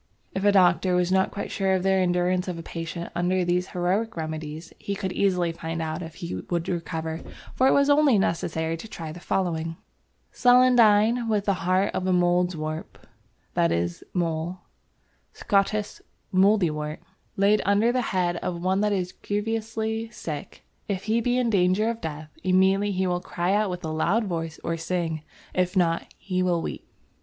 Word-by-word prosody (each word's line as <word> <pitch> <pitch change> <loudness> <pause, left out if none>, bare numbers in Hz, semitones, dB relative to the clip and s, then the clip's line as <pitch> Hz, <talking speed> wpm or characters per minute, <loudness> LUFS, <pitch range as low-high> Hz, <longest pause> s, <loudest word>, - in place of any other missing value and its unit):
If 190 - -2
a 205 - +5
doctor 180 -1 +4
was 180 0 +1
not 190 0 +3
quite 200 - -5
sure 190 -2 +1
of 185 - -1
the 195 - +3
endurance 180 0 +1
of 180 -2 -3
a 165 - -7
patient 165 +1 -6
under 180 +1 +1
these 180 +1 +1
heroic 185 +4 -1
remedies, 155 0 -5
he 200 - -3
could 190 -2 -3
easily 180 -4 +1
find 165 0 -5
out 160 +1 -3
if 160 -2 -8
he 170 - -6 0.2
would 170 -1 -1
recover, 165 -2 -3 0.3
for 260 - +3
it - - +5
was 280 0 +4
only 285 -4 +5
necessary 165 -3 -1
to 220 - -9
try 165 -6 -7
the 170 - -9
following: 165 -3 -1 0.5
"Celandine 240 -2 +5
with 210 -2 +1
the 200 - +3 0.2
heart 190 +2 +2
of 185 - -2
a - - +2
Mouldwarp" 175 -3 0 0.6
(that 85 - +2
is 85 +1 -1
mole, 170 0 -2 0.7
Scottice 205 +1 0 0.3
moudiewort) 175 -6 +2 0.4
"laid 200 +2 +4
under 205 +4 +3
the 250 +1 +1
Heade 180 -6 0
of 170 0 -3
one 190 +3 +1
that 210 0 +2
is 180 -2 -1
grievouslie 220 +1 -2
Sicke, 150 -9 -7 0.2
if 195 -3 -2
he 225 +2 +1
be 245 +2 +1
in 245 -2 +1
danger 195 +3 +3
of 230 - -8
Death, 155 -1 -6
immediately 190 +2 +3
he 190 0 0
will 180 -1 0
cry 180 +1 -1
out 210 0 +2
with 180 -1 -5
a 160 - -3
loud 175 +8 +1
voice 165 -5 -4
or 165 0 -1
sing; 165 -2 -2 0.3
if 180 +1 0
not, 170 -2 +1
he 185 -2 -2
will 180 -2 +2
weep." - - -6
180 Hz, 175 wpm, -25 LUFS, 165-205 Hz, 0.7 s, a